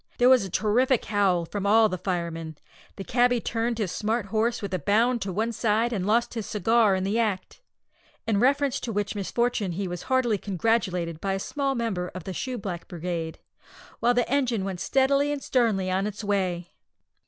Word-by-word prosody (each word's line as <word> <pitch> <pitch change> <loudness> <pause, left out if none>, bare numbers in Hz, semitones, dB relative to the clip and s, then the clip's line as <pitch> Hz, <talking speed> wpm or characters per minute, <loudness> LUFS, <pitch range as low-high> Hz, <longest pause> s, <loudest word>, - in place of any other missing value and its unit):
There 245 +1 +5
was 260 -4 +6
a 190 - -5
terrific 235 +6 +2
howl 195 -5 +1
from 200 +3 -3
all 220 +2 +6
the 185 - -3
firemen; 165 -4 -3 0.4
the 195 - -6
cabby 245 +2 +2
turned 230 +1 -2
his 205 -6 -2
smart 220 0 -1
horse 225 +3 0
with 200 -2 -5
a 185 - 0
bound 230 - +2
to 190 - -3
one 220 +5 -1
side, 225 +1 +1
and 195 -3 -2
lost 235 +3 +2
his 225 -3 -4
cigar 220 0 +3
in 185 - -1
the 205 +4 0
act 215 - -2 0.6
in 215 -3 +1
reference 275 +2 +2
to 235 - -4
which 205 -1 -2
misfortune 210 -1 -1
he 195 +2 -3
was 175 -1 -5
heartily 250 -5 +2
congratulated 180 -5 -1
by 195 -1 -1
a 195 - -2
small 275 +5 -2
member 215 -7 -2
of 185 - -6
the 190 - -5
Shoe 255 +5 -4
black 185 -5 -6
Brigade, 170 -2 -4 0.6
while 240 +1 +3
the 245 -1 +2
engine 250 -7 0
went 190 -2 -4
steadily 275 +4 +2
and 285 -2 -4
sternly 210 -7 +1
on 190 +2 0
its 210 +1 -6
way. 185 -4 -1
210 Hz, 195 wpm, -26 LUFS, 185-240 Hz, 0.6 s, was